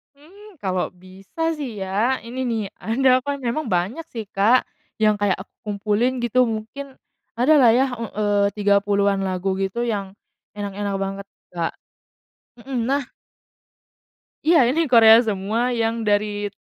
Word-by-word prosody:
Mmm, 365 - -17
kalau 185 -2 -2
bisa 190 - -5
sih 235 -9 -5
ya 210 +7 0
ini 240 +3 -8
nih 225 -2 -1 0.2
ada 255 +3 +3
apa 260 +3 -5
memang 270 +2 -3
banyak 200 - -1
sih, 225 - -4
Kak, 220 +6 +3 0.4
yang 215 -1 +3
kayak 205 -2 +2
aku - - -25
kumpulin 215 +5 0
gitu 250 +1 +2
mungkin 230 +5 -6 0.4
ada 250 +6 +3
lah 245 -4 +6
ya 260 +2 +4
e - - -5
eee, 205 -1 +1 0.2
30-an 200 -1 +2
lagu 190 +1 -2
gitu 195 +5 -2
yang 200 -5 -3 0.4
enak-enak 205 -1 -4
banget, 195 0 -5 0.2
Kak, 170 -2 -3 0.9
mhm, 260 +1 -5
nah 280 +1 +1 1.4
Iya, 310 -7 +5
ini 290 +7 +1
Korea 225 0 +8
semua 220 +4 -1
yang 230 -1 -1
dari 205 -1 0
220 Hz, 140 wpm, -22 LUFS, 200-250 Hz, 1.4 s, Korea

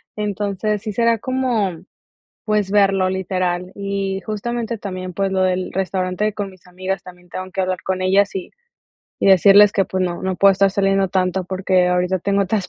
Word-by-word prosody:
Entonces, 210 0 -2
sí 215 -1 -4
será 230 +2 +2
como, 250 -6 0 0.7
pues, 210 -2 0
verlo 195 -2 +3
literal 185 -1 -2
y 195 -1 -3
justamente 230 +2 -3
también, 185 -2 -6
pues, 195 +2 -1
lo 190 0 +1
del 185 0 -1
restaurante 190 +2 -1
con 205 -1 -4
mis 185 -2 -19
amigas 185 +1 -4
también 180 -1 -14
tengo 185 +1 -6
que 190 - -2
hablar 185 0 -1
con 185 0 -2
ellas 195 +2 +2
y 190 - -4 0.7
y - - +1
decirles 200 +2 +7
que, 195 - +2
pues, 185 0 -2
no 175 -1 -3
no 190 -1 -2
puedo 195 +1 +6
estar 195 +1 +3
saliendo 195 0 +1
tanto 185 0 0
porque 185 0 +1
ahorita 180 +1 +1
tengo 200 +2 +1
otras 195 0 -1
195 Hz, 180 wpm, -20 LUFS, 185-200 Hz, 0.7 s, decirles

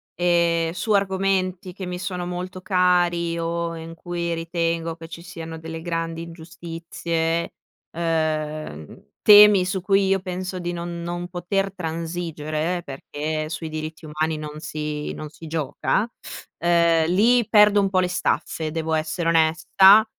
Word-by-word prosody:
ehm, 170 -2 +2
su 185 +5 -1
argomenti 190 -2 0
che 190 0 -6
mi 180 0 -5
sono 180 -2 -3
molto 180 +1 -5
cari 175 -2 +2
o 170 0 -2
in 165 0 -8
cui 170 0 -3
ritengo 165 0 -2
che 165 0 -10
ci 170 0 -8
siano 165 -2 -8
delle 160 0 -7
grandi 165 -1 -3
ingiustizie, 165 0 -3 0.4
uhm, 155 - -2 0.2
temi 210 -2 +8
su 190 0 -2
cui 195 +1 +3
io 195 0 +2
penso 185 0 -4
di 175 0 -3
non 170 0 -5
non 175 +1 -4
poter 190 +2 -2
transigere, 165 -1 -3
perché 155 +3 -4
sui 160 0 -4
diritti 155 +1 -6
umani 155 +1 -1
non 150 0 -7
si 150 -1 -4
non 155 - -7
si 155 +2 -13
gioca, 160 - -1 0.5
uhm, 170 -1 +3
lì 230 +7 +4
perdo 210 -1 +6
un 195 - +1
po' 190 -1 +2
le 180 - +2
staffe, 165 -3 -1
devo 160 0 -2
essere 160 +2 -1
onesta. 175 +6 +6
170 Hz, 145 wpm, -23 LUFS, 160-180 Hz, 0.5 s, temi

